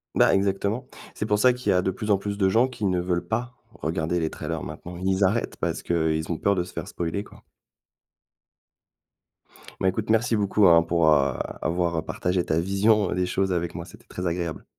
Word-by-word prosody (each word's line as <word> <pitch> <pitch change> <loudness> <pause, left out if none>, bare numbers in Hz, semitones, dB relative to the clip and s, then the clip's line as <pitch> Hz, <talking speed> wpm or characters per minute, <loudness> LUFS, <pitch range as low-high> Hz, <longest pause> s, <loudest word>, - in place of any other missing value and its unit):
Ben, - - +5
exactement. 100 +5 0 0.3
C'est - - -3
pour 105 -1 +1
ça 125 +3 +5
qu'il 125 +1 -1
y - - +4
a 90 - +3
de 95 - 0
plus 105 +3 -3
en 100 - +4
plus 100 0 -4
de 95 -2 +3
gens, 115 +6 +3
qui 120 -5 -5
ne 90 -2 +1
veulent 90 -1 -1
pas 120 +2 -3 0.2
regarder 80 +2 -2
les 80 -1 -1
trailers, 80 0 -5
maintenant. 90 0 -8
Ils 95 +1 +1
arrêtent 105 +5 0
parce - - -2
qu'ils 80 -1 0
ont 80 - -1
peur 100 - +2
de 90 - 0
se 90 - -11
faire - - -6
spoiler 85 +4 -3
quoi. - - -17 2.4
Bah, 95 - +1
écoute 105 +3 -1
merci 115 +1 +2
beaucoup, 100 -1 +3
hein, 85 -1 +6
pour, 85 -1 +2
heu, 70 -3 +3 0.3
avoir, 85 0 0
heu, - - +1
partagé 90 +2 -1
ta 80 +1 +1
vision 100 +2 +2
des 90 0 0
choses 95 +1 0
avec 85 -1 -2
moi, 85 0 -5
c'était - - -15
très 90 0 -5
agréable. 85 -1 -3
95 Hz, 210 wpm, -25 LUFS, 85-105 Hz, 2.4 s, hein